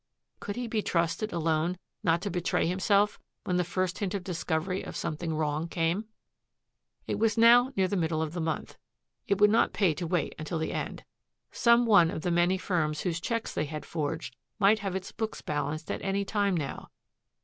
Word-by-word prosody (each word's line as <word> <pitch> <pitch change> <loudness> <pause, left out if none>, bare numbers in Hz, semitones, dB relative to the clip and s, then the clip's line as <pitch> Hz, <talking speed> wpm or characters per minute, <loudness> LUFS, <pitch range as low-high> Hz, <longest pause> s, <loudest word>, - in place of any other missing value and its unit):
Could 205 - -5
he 245 - -3
be 225 -2 -1
trusted 170 +4 0
alone 165 +1 0 0.2
not 170 +1 +2
to 205 - -2
betray 175 0 0
himself 200 +4 +2 0.2
when 180 -3 0
the 180 - +2
first 185 +1 -2
hint 200 -2 -2
of 195 - -3
discovery 180 0 -2
of - - -8
something 160 +1 -3
wrong 155 +1 -1
came? 170 +5 0 1.0
It - - -2
was 225 +1 +2
now 240 +3 +7
near 190 -1 +3
the 200 - -2
middle 160 -3 0
of 160 0 -2
the 175 - -3
month. 160 -1 -3 0.5
It 200 -1 +1
would 210 0 +6
not 225 - +3
pay 185 -6 +3
to 170 +2 -4
wait 175 -1 0
until 155 +2 -3
the 160 - -2
end. - - -4 0.5
Some 235 0 +4
one 200 -7 +6
of 160 - -5
the 180 - 0
many 175 +2 +3
firms 155 -5 -1
whose 170 -2 -2
checks 230 +2 -2
they - - -1
had 150 +1 -6
forged 160 0 -3 0.2
might 215 +1 +4
have 195 -2 -3
its 190 - -4
book 220 -1 -4
balanced 155 +1 -2
at - - -3
any 195 +1 -1
time 200 -3 +1
now. 145 -4 -5
180 Hz, 195 wpm, -29 LUFS, 160-205 Hz, 1.0 s, now